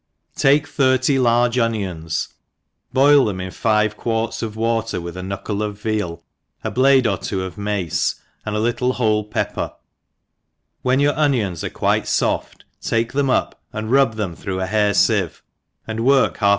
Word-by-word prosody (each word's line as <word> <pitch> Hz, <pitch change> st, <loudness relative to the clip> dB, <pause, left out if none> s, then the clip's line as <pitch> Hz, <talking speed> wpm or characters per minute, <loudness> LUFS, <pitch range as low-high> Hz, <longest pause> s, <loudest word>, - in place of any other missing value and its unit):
TAKE 145 Hz, +2 st, +4 dB
thirty 130 Hz, -1 st, +2 dB
large 120 Hz, 0 st, +3 dB
onions, 95 Hz, -9 st, -2 dB, 0.6 s
boil 140 Hz, +1 st, +6 dB
them 100 Hz, -4 st, -2 dB
in 95 Hz, 0 st, -5 dB
five 105 Hz, 0 st, +1 dB
quarts 115 Hz, 0 st, -2 dB
of 110 Hz, -2 st, -4 dB
water 115 Hz, -2 st, -1 dB
with 85 Hz, 0 st, -7 dB
a 90 Hz, -, -5 dB
knuckle 100 Hz, +2 st, -4 dB
of 105 Hz, -1 st, -4 dB
vea}, 105 Hz, -6 st, -2 dB, 0.5 s
a -, -, -2 dB
blade 130 Hz, 0 st, +4 dB
or 100 Hz, -5 st, +1 dB
two 95 Hz, -2 st, -3 dB
of 95 Hz, -3 st, -6 dB
mace, 100 Hz, -5 st, -1 dB, 0.3 s
and 105 Hz, -, -3 dB
4 105 Hz, -, 0 dB
little 120 Hz, +2 st, 0 dB
whole 110 Hz, -4 st, +1 dB
pepper 105 Hz, -1 st, -2 dB
j; -, -, -21 dB, 1.1 s
whea 130 Hz, +1 st, +2 dB
your 145 Hz, 0 st, +2 dB
onions 120 Hz, -, 0 dB
are -, -, -2 dB
quite -, -, 0 dB
fof( -, -, 0 dB, 0.3 s
take 115 Hz, +1 st, -1 dB
them 140 Hz, -1 st, +1 dB
up, -, -, 0 dB
and 110 Hz, +1 st, -4 dB
rub 135 Hz, -4 st, +4 dB
them 100 Hz, -6 st, -3 dB
through 95 Hz, +1 st, -4 dB
a 95 Hz, -, -1 dB
hair 105 Hz, +1 st, +1 dB
fifve* -, -, +2 dB, 0.5 s
ajjd 110 Hz, 0 st, -4 dB
work 135 Hz, +3 st, +3 dB
half 100 Hz, -2 st, +2 dB
110 Hz, 170 wpm, -20 LUFS, 100-125 Hz, 1.1 s, boil